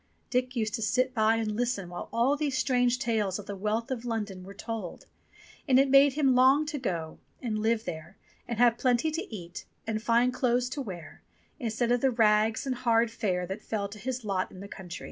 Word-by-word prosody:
Dick 250 0 0
used 215 -3 -1
to - - -2
sit 255 +4 +1
by 220 -1 +3
and 220 -2 -1
listen 235 -5 -1
while 175 0 -7
all 240 +5 +2
these 285 -3 -1
strange 250 -2 +2
tales 220 -7 0
of 205 - -8
the 200 - -5
wealth 215 +5 -2
of 245 -3 -3
London 210 -6 -4
were 190 - -10
told, 215 -3 -6 0.6
and 260 -2 +5
it 270 0 +3
made 275 0 +7
him 275 -2 +3
long 265 +4 +5
to 300 -1 -4
go 165 -9 -3 0.2
and 220 -4 -2
live 225 +1 +1
there 165 +2 -7 0.3
and 235 - -3
have 235 0 +4
plenty 255 +4 +2
to 330 - -4
eat 175 -5 -7 0.2
and 220 -1 -2
fine 235 +2 +3
clothes 250 -1 +1
to 280 +2 -4
wear 180 - -8 0.4
instead 235 -1 -1
of 245 -1 +2
the 270 - +4
rags 220 0 +3
and 260 -2 -2
hard 235 -2 +2
fare 185 -5 -1
that 190 +4 -6
fell 205 -2 -3
to 210 +1 -11
his 250 +1 -4
lot 190 -2 -1
in 185 - -12
the 200 - -8
country. 180 -3 -8
230 Hz, 215 wpm, -28 LUFS, 210-255 Hz, 0.6 s, made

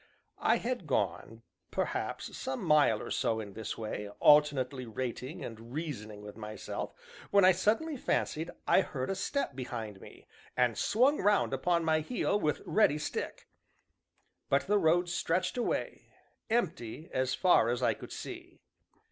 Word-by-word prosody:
I - - +3
had 245 -8 -3
gone, 115 -4 -1 0.3
perhaps, - - -3
some 130 - -4
mile 145 -8 +4
or - - -7
so 110 -1 0
in 100 -3 -7
this 110 0 -5
way, 105 -2 -4
alternately 140 -4 +4
rating 125 +5 -4
and 115 +1 -9
reasoning 110 -10 -5
with 105 0 -9
myself, 110 -1 -6 0.3
when 200 -2 +5
I 185 - +8
suddenly 225 - +1
fancied 160 -8 -1 0.2
I - - +6
heard 130 -3 -3
a - - -1
step 280 - -2
behind 115 -6 -5
me, - - -13 0.3
and 125 -2 +3
swung 260 +7 +3
round 205 -8 +3
upon 170 +5 +1
my 160 -1 +3
heel, 205 +4 0
with 150 -5 -1
ready 210 -9 +3
stick; 150 - -4 1.0
but 140 - +3
the 205 +2 +3
road 175 +1 +3
stretched 180 +3 0
away 245 - -2 0.4
empty 165 - -1
as 130 0 +1
far 175 -11 +4
as 120 0 -1
I - - +4
could - - -11
see. - - -8
150 Hz, 150 wpm, -31 LUFS, 115-185 Hz, 1.0 s, I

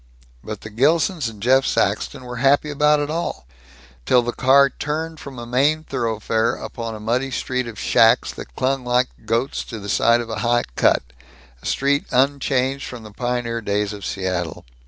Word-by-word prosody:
But 105 -2 -6
the 110 - -9
Gilsons 150 - +2
and 110 -2 -12
Jeff 130 +2 +5
Saxton 130 - 0
were 125 -1 -7
happy 140 +4 +3
about 150 +1 +3
it 145 0 -2
all 165 - -3 0.6
till 125 -1 +5
the 120 - -1
car 135 +2 +4
turned 160 +3 -4
from 135 -2 -9
a 120 - -6
main 140 +6 +2
thoroughfare 115 -2 -1
upon 115 -2 -6
a - - -8
muddy 120 +5 -1
street 130 -1 -2
of 115 -3 -8
shacks 115 +2 +4
that - - -10
clung 135 0 0
like 125 +1 +2 0.2
goats 115 +4 0
to 115 - -7
the 100 -1 -7
sides 115 +4 +3
of 115 - -11
a 110 - -3
high 120 0 +2
cut, - - +3 0.6
a - - -7
street 140 +1 +1
unchanged 135 0 +1
from 120 -3 -8
the 110 - -11
pioneer 120 0 -2
days 105 0 -1
of 100 -1 -9
Seattle. 90 -5 -3
125 Hz, 180 wpm, -21 LUFS, 115-140 Hz, 0.6 s, Jeff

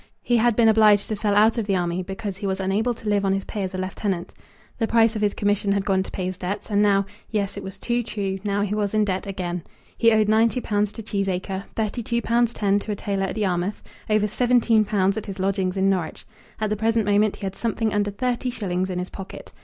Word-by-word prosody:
He 240 - +2
had 235 0 +3
been 230 0 +4
obliged 215 -2 +5
to 215 - -1
sell 205 0 0
out 220 +3 +4
of 215 - -3
the 195 - +2
army, 175 0 -1
because 195 +1 -5
he 200 - -3
was 190 0 -1
unable 205 +6 0
to 220 - -10
live 205 -1 +2
on 195 -1 +2
his 195 0 -2
pay 210 - -4
as 190 -1 -3
a - - -2
lieutenant. 185 -1 -3 0.5
The 225 - +1
price 225 0 +3
of 215 - -2
his 205 -1 +1
commission 205 -1 +1
had 200 -1 -1
gone 190 -1 +2
to 190 - -5
pay 185 - -4
his 185 0 -4
debts, 195 +4 -4
and 205 0 +3
now, 200 -1 +3 0.2
yes, 205 -2 -1
it - - -5
was 190 0 -8
too 240 +4 -1
true, 195 -4 -3
now 205 -1 0
he 205 0 -2
was 210 0 -1
in 215 -1 +3
debt 190 0 -2
again. 180 -3 -3 0.3
He 230 -1 +4
owed 215 -1 +3
ninety 225 +3 +3
pounds 210 -3 0
to 225 - -7
Cheesacre, 195 -1 -2
thirty 220 +2 -1
two 235 +1 -1
pounds 235 0 +2
ten 205 -3 +1
to 210 - -5
a - - -1
tailor 195 -1 -2
at - - -5
Yarmouth, 190 -1 -1 0.3
over 215 0 +3
seventeen 235 -1 +3
pounds 195 -1 +1
at 220 - -5
his 195 -1 -6
lodgings 190 -1 0
in 190 0 +2
Norwich. 185 -5 -1 0.3
At 215 -1 -1
the - - +2
present 225 +1 +1
moment 205 0 +3
he - - -7
had 190 - -3
something 225 -1 -1
under 205 0 +1
thirty 250 +4 -1
shillings 190 -6 -2
in 180 - -3
his 180 0 -4
pocket. 195 -1 -9
205 Hz, 250 wpm, -23 LUFS, 195-220 Hz, 0.5 s, obliged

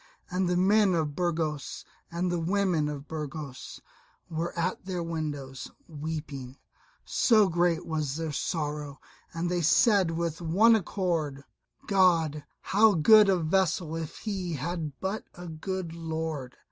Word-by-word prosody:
and 180 0 0
the 180 - +1
men 195 0 +4
of 155 -3 -1
Burgos 160 -4 -2 0.2
and 175 +1 -1
the 175 - 0
women 175 -3 +1
of 145 0 -6
Burgos 150 -3 -6 0.5
were 165 +2 -2
at 180 +2 -2
their 180 -2 -3
windows, 145 -5 -5 0.2
weeping, 145 -4 -6 0.5
so 215 -4 +4
great 175 -1 +1
was 155 -4 -2
their 160 -1 -3
sorrow; 150 -2 -3 0.3
and 165 +1 -2
they 175 0 0
said 195 - +4
with 165 0 -2
one 200 +8 +5
accord, 165 -8 -1 0.4
"God, 165 -6 +3 0.2
how 210 +1 +4
good 210 +6 +7
a 190 - +4
vassal 170 -1 0
if 165 -2 -5
he 190 -5 -3
had 155 0 -4
but 195 +3 -3
a 175 0 -9
good 170 +1 -4
Lord!" 160 -5 -4
165 Hz, 135 wpm, -28 LUFS, 155-185 Hz, 0.5 s, good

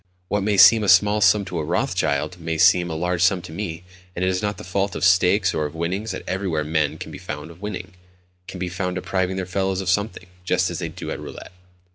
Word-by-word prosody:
What 105 - 0
may 100 0 0
seem 110 +4 +8
a 100 - 0
small 105 +4 +5
sum 100 +1 +4
to 90 -3 -4
a - - -2
Rothschild 90 +3 -1
may 80 -1 -3
seem 90 +1 +4
a 80 - -4
large 90 +1 -1
sum 95 +1 +4
to 85 - -9
me, 85 -1 -5 0.3
and 90 - -1
it - - +2
is 90 -1 -1
not 105 -2 -2
the - - -9
fault 95 +1 -2
of - - -4
stakes 95 +1 +4
or 75 -1 -1
of 75 - -12
winnings 95 +6 -3
that - - -5
everywhere 90 -5 -1
men 75 -1 0
can - - -8
be - - -9
found 85 +3 -8
winning, 100 -2 -6 0.5
can 95 - -8
be 90 - -2
found 90 +1 -3
depriving 95 0 -1
their 95 -1 -3
fellows 95 +1 -1
of 95 -2 -2
something, 100 -1 -2 0.2
just 90 0 +1
as 85 - -4
they - - -3
do - - -7
at - - -4
roulette. - - -9
90 Hz, 240 wpm, -22 LUFS, 85-95 Hz, 0.5 s, seem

